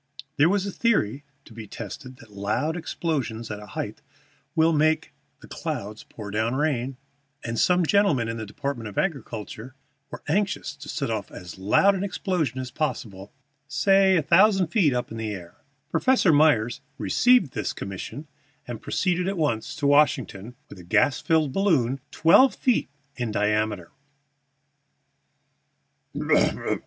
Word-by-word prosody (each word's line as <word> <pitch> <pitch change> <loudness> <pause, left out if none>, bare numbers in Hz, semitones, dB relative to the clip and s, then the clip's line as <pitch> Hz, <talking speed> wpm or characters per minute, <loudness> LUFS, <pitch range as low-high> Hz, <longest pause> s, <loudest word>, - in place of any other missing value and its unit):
There 150 +3 +5
was 200 0 +1
a 200 - -3
theory 145 - 0 0.2
to - - -15
be 110 -1 -9
tested 120 +6 -8
that 120 -6 -17
loud 105 +11 -1
explosions 135 -10 -3
at 105 - -5
a 105 - -11
height - - -4 0.5
will 165 0 +4
make 155 +1 +1 0.3
the - - -13
clouds 105 +2 -5
pour 105 -2 -10
down 110 +5 0
water, 135 -4 0 0.5
and 115 -1 -3
some 180 -1 +3
gentlemen 160 - +2
in 115 0 -4
the 110 - -5
Department 120 +1 -4
of 100 - -13
Agriculture 130 - -4 0.3
were - - -9
anxious 205 -1 -1
to - - -10
set - - -2
off - - -3
as 90 +1 -10
loud 110 - +4
an 195 0 -2
explosion 180 - -2
as 130 -1 -5
possible, 105 -10 -4 0.4
say 195 +3 +4
a 160 - +1
thousand 190 +2 +4
feet 170 -7 +3
up 125 -1 -2
in 115 - -6
the 110 -1 -3
air. 85 -2 -11 0.3
Professor 255 -10 +3
Myers 135 -7 +3 0.2
received 245 - +3
this 105 - -2
commission, 100 +10 -7 0.4
and 120 -2 -6
proceeded 180 -1 0
at 195 0 -2
once 120 -9 -1
to 145 - -3
Washington 130 -6 +2
with - - -12
a - - -11
gas 100 +9 +2
balloon 155 - +1
twelve 255 +12 +5
feet 250 -3 +1 0.3
in 120 -2 -2
diameter. 105 -3 -1
135 Hz, 145 wpm, -25 LUFS, 110-170 Hz, 0.5 s, There